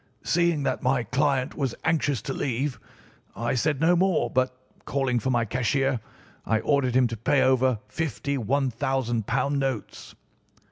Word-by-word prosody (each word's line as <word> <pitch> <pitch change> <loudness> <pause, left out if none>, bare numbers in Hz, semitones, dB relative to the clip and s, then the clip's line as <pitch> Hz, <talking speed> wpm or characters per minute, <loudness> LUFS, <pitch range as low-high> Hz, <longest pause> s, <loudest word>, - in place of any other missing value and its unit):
"Seeing 170 -3 +2
that 130 -1 -1
my 130 -1 +1
client 130 +2 0
was 135 -5 -2
anxious 145 -7 +1
to 135 - -3
leave, 130 +1 -2 0.6
I 115 +2 -1
said 135 +3 0
no 165 +3 +4
more 185 0 +2
but, 130 0 0 0.3
calling 130 -3 0
for 125 - -2
my 120 -2 +2
cashier, 125 +3 0 0.4
I 110 0 +1
ordered 130 0 +1
him 130 -1 +5
to 115 - -4
pay 125 +5 +2
over 130 -2 +3
fifty 140 -3 -3
£ 125 - -3
1000 130 +1 0
notes. 135 -5 -4
130 Hz, 150 wpm, -26 LUFS, 120-140 Hz, 0.6 s, him